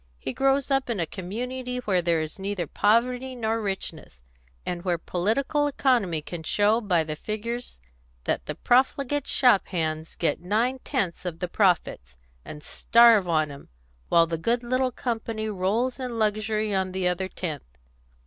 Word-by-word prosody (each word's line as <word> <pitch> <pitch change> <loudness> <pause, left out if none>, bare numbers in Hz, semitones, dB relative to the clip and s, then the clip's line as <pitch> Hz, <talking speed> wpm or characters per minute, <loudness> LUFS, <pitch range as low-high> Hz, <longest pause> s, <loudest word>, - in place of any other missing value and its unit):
He 130 - -4
grows 270 +1 +1
up 270 -2 +1
in 225 -5 -1
a 165 - +1
community 250 +9 -5
where 200 -7 +1
there 170 -2 +1
is 155 +4 -6
neither 195 -2 -2
poverty 245 - +1
nor 225 -1 -1
richness, 165 - -5 0.4
and 175 -1 -3
where 180 -2 +1
political 230 - 0
economy 235 - +1
can 160 +3 -6
show 210 +7 +2
by 180 -6 +2
the 155 -1 -4
figures 220 - -5 0.4
that - - -2
the - - -3
profligate 270 +2 +1
shop 250 -7 +4
hands 160 -3 -3
get 165 -1 0
nine 225 +8 0
tenths 205 -13 -2
of 175 -3 -4
the 180 - -3
profits, 175 - +1 0.3
and 150 0 -9
starve 230 -5 +5
on 155 -3 +1
'em, 140 - -12 0.4
while 170 0 +5
the 165 -1 -3
good 235 +7 0
little 255 +1 0
company 225 -3 -3
rolls 215 +7 0
in 250 -3 -4
luxury 215 0 0
on 190 -1 0
the 185 -1 0
other 180 +1 -1
tenth. 150 - -6
205 Hz, 160 wpm, -26 LUFS, 175-245 Hz, 0.4 s, starve